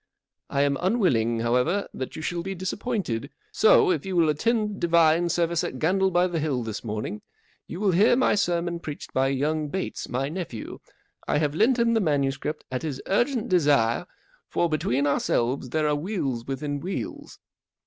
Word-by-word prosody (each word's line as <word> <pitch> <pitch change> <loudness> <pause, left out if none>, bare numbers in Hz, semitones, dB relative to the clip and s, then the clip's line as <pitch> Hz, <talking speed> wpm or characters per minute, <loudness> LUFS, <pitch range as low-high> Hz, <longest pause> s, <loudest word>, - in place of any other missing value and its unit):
I 140 0 +1
am 140 -1 +1
unwilling, 125 - +2
however, 125 +12 +1
that 130 - -6
you 160 - -6
shall 170 +2 -2
be 195 +2 -4
disappointed, 185 - -3 0.2
so, 440 -1 +5
if - - -1
you 190 -1 -4
will 165 -3 +4
attend 210 +6 0
divine 170 0 +4
service 170 0 +1
at 130 - -4
Gandle 190 +6 +2
by 175 0 +3
the 175 -3 -1
Hill 140 -5 -1
this 110 -2 -5
morning, 105 -1 -4 0.5
you 170 - -7
will 200 -2 +2
hear 200 +7 +5
my 255 - +3
sermon 175 -3 0
preached 150 -3 -8
by 130 +1 +2
young 150 +3 0
Bates, 190 +6 -4
my 130 +2 -1
nephew. 155 - -6 0.5
I - - +2
have 145 -1 0
lent 225 +10 +3
him 235 -1 +2
the 225 - +2
manu¬ 145 -6 +1
script 150 +3 -5
at 130 - -2
his 145 -5 -4
urgent 240 +3 +1
desire, 145 -10 +2 0.4
for, 170 - +1
between 140 -3 0
our¬ 140 - +1
selves, 125 +2 0
there 155 +3 0
are 150 - +2
wheels 145 - -3
within 145 +1 -3
wheels. 185 +6 -6
160 Hz, 180 wpm, -25 LUFS, 135-190 Hz, 0.5 s, so